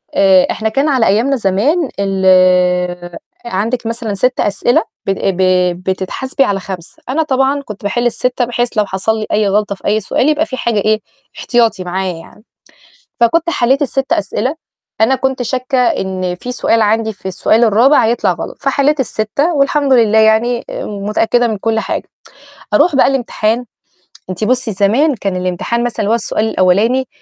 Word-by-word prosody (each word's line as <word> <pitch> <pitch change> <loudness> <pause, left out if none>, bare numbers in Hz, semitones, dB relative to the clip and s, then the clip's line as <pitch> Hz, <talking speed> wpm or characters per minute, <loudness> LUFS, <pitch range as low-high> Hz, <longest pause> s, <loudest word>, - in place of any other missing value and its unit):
آآ 190 -2 +4
إحنا 220 0 -2
كان 275 +7 0
على 255 -5 +2
أيامنا 235 +8 +2
زمان 255 - 0
ال 180 -2 +2 0.3
عندِك 230 +3 -2
مثلًا 230 -2 -3
6 250 +6 0
أسئلة 205 +4 +1 0.2
بت 195 - +1
ب 190 -2 -1 0.4
بتتحاسبي 190 +9 -2
على 200 -5 -1
5، 185 -2 -9
أنا 315 +4 +1
طبعًا 270 0 0
كنت 210 -7 -10
باحل 220 +4 -1
ال6 250 +1 0
بحيث 240 0 -2
لو 210 - +3
حصل 200 +3 -1
لي 215 - -3
أي 210 -1 +2
غلطة 205 0 0
في 190 - -19
أي 215 - +2
سؤال 245 +7 0
يبقى 310 +1 +1
في 260 - -6
حاجة 230 -4 0
إيه، 215 +1 +1 0.4
احتياطي 230 -6 +1
معايا 185 +1 -3
يعني. 165 +5 -14 0.8
فكنت 330 +8 +2
حلّيت 265 -1 +1
ال6 270 -1 -1
أسئلة، 230 +8 -1 0.5
أنا 225 +4 +4
كنت 265 -1 -2
شاكة 255 +2 -2
إن 190 -7 -1
في 245 +7 -7
سؤال 230 -2 +1
عندي 220 +1 +1
في 190 -1 -13
السؤال 220 +5 +2
الرابع 235 +6 +4
هيطلع 235 +2 +1
غلط، - - -7
فحليت 280 +1 +1
الستة، 265 +7 -1
والحمد 280 0 +1
لله 225 -3 +4
يعني 220 +2 +2
آآ - - -5
متأكدة 215 +4 0
من 215 - -3
كل 225 +2 -1
حاجة. - - -4 0.7
أروح 310 0 +3
بقى - - +5
الامتحان، 240 -3 -1 0.7
أنتِ 185 +3 -4
بُصّي 250 0 +1
زمان 230 +10 +2
كان 195 -4 -3
الامتحان 185 +6 -2
مثلًا 240 -1 -3
اللي 205 - 0
هو - - +4
السؤال 220 -1 -1
الأولاني 220 +8 +2
225 Hz, 170 wpm, -15 LUFS, 195-255 Hz, 0.8 s, بقى